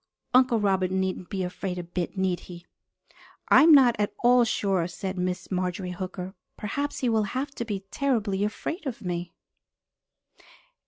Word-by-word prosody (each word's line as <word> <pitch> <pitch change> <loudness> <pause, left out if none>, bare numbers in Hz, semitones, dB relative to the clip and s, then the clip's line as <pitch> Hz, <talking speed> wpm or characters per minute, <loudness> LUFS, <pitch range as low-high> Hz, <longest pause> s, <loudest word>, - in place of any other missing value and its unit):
Uncle 250 -2 +5
Robert 190 -3 +1
needn't 190 -1 -2
be 190 -2 -2
afraid 180 0 -4
a 175 - -4
bit, 175 +2 -4
need 185 -2 0
he?" 175 0 -10 0.8
"I - - +8
am 325 - +7
not 260 -5 +7
at 205 - -1
all 245 0 +6
sure," 195 -6 0
said 190 +2 -5
Miss 180 +1 -3
Marjorie 180 0 -2
Hooker. 185 +1 -6 0.2
"Perhaps 285 +7 -3
he 250 - +2
will 220 -1 +3 0.2
have 275 +2 -2
to 235 - -5
be 205 -4 -3
terribly 215 -8 0
afraid 295 - -3
of 245 -3 -5
me." 175 -1 -3
195 Hz, 160 wpm, -26 LUFS, 180-235 Hz, 0.8 s, I